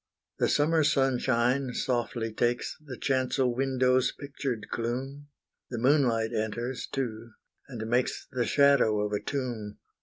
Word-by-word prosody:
The - - +2
summer 155 +2 +3
sunshine 130 -2 +1
softly 120 -3 -1
takes 120 +2 0
The 130 -4 -8
chancel 130 -1 +1
window's 130 -1 +2
pictured 135 -6 -5
gloom; 130 +5 -3 0.4
The 120 - -4
moonlight 120 -3 +2
enters 115 +3 -3
too, 115 -3 -4 0.4
and 115 -4 -5
makes 120 +2 0
The 125 -3 -1
shadow 140 -7 +4
of 105 0 -1
a 105 - +1
tomb. 115 -3 -4
125 Hz, 125 wpm, -28 LUFS, 115-135 Hz, 0.4 s, shadow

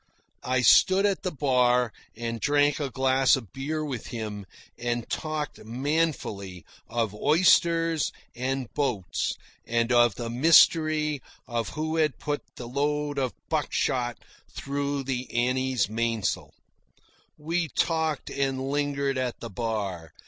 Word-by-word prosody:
I 130 0 0
stood 190 +9 +6
at 200 -2 +1
the 185 - -1
bar 125 -5 +2 0.2
and 115 0 -3
drank 145 0 +3
a 140 -2 -2
glass 130 0 +3
of 115 -8 -8
beer 155 +3 -3
with 130 -6 -5
him, 105 -4 -5 0.3
and 120 -1 -2
talked 155 -3 -3
manfully 115 - -2 0.2
of 115 -3 -1
oysters, 165 +4 +3 0.2
and 130 -1 -3
boats, 120 - -1 0.3
and 115 +1 0
of 120 -3 +5
the 115 -1 -4
mystery 155 +1 +4 0.3
of 120 -2 -2
who 160 +1 -1
had 155 -5 +1
put 145 -1 -3
the 120 - -7
load 145 +2 -1
of 130 -6 -1
buckshot 120 -2 0 0.3
through 140 0 -3
the 130 -1 -3
Annie's 125 -1 +1
mainsail. 115 -1 -2 0.8
We 165 +2 -1
talked 160 0 -1
and 135 -1 -1
lingered 140 -2 0
at 125 -2 -2
the 115 - -7
bar. 100 -7 -3
130 Hz, 125 wpm, -27 LUFS, 120-150 Hz, 0.8 s, stood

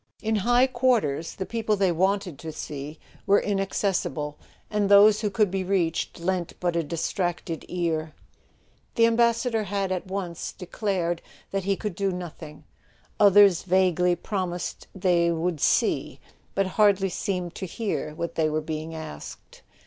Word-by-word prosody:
In 220 0 +1
high 245 +5 +4
quarters 240 - +1
the 190 - -4
people 225 -1 0
they 195 -2 +2
wanted 190 -2 0
to 160 - -6
see 150 0 -7 0.3
were 200 +1 +6
inaccessible; 195 -6 -1 0.3
and 210 -2 0
those 205 +1 +7
who 210 - 0
could 205 -1 +1
be 190 0 -1
reached 180 -4 -1
lent 175 0 -1
but 175 -1 0
a 170 - +2
distracted 170 +1 -3
ear. 160 -3 -2 0.8
The 230 - +5
Ambassador 230 -1 +2
had 195 -1 -2
at 185 0 -2
once 185 -3 -4
declared 180 -2 -2 0.3
that 195 -1 -2
he 195 0 +2
could 210 -1 -4
do 195 +2 -1
nothing; 160 -4 -8 0.6
others 200 -3 +7
vaguely 180 -1 +2
promised 180 -1 -4
they 175 -2 +2
"would 165 -2 -1
see"—but 195 - 0
hardly 195 0 +3
seemed 180 -2 -3
to 190 - -5
hear 165 -6 -3
what 170 +1 -4
they 155 -1 +1
were 155 0 0
being 155 +1 -5
asked. 155 - -9
185 Hz, 145 wpm, -26 LUFS, 170-205 Hz, 0.8 s, those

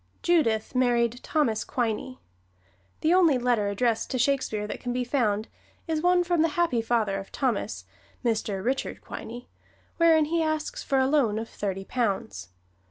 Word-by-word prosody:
Judith 255 -12 +2
married 245 -2 +2
Thomas 235 -9 0
Quiney. 245 +1 -2 0.8
The 320 +2 +3
only 340 -7 +5
letter 240 -4 +1
addressed 225 +3 0
to 255 - -1
Shakespeare 245 -5 0
that 210 - -5
can 245 - -4
be 250 +1 -1
found 225 -5 0 0.4
is 320 -1 -1
one 355 +1 +4
from 345 -2 +1
the 325 - +4
happy 330 -10 +2
father 220 -4 0
of 195 - -10
Thomas, 200 - -2 0.4
Mr. 215 -4 -1
Richard 265 +2 -2
Quiney, 240 +2 -8 0.5
wherein 325 -2 +5
he 330 +2 0
asks 310 -1 -2
for 275 - 0
a 265 - +4
loan 265 -7 +2
of 225 +1 -4
thirty 195 -1 -4
pounds. 190 - -2
245 Hz, 160 wpm, -26 LUFS, 215-300 Hz, 0.8 s, only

